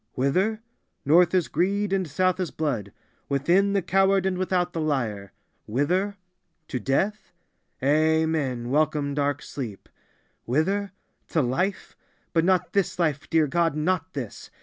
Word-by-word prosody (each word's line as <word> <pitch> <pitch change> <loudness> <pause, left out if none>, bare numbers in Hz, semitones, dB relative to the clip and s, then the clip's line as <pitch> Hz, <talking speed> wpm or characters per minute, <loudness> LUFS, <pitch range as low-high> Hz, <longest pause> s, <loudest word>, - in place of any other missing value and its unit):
Whither? 190 - 0 0.4
North 170 +5 +5
is 180 -3 +2
greed 195 +4 0
and 190 -2 0
South 185 +5 +1
is 180 -3 -1
blood; 120 -11 -2 0.4
within, 175 +9 +2
the 200 -2 +1
coward, 195 +1 +3
and 190 -1 +1
without, 180 -1 0
the 165 - -2
liar. 115 -10 -2 0.4
Whither? 180 - 0 0.5
To 125 - -2
death? 190 - -1 0.5
Amen! 155 -4 +1
Welcome 150 -1 +1
dark 145 0 -1
sleep! 115 -8 -7 0.6
Whither? 190 - 0 0.4
To 160 - +1
life? 180 +11 -2 0.4
But 165 -1 +3
not 180 -2 +1
this 200 -3 0
life, 155 -4 -1
dear 160 -1 +3
God, 165 +1 +1
not 165 +3 -1
this. 125 -7 -6
160 Hz, 135 wpm, -25 LUFS, 140-185 Hz, 0.6 s, North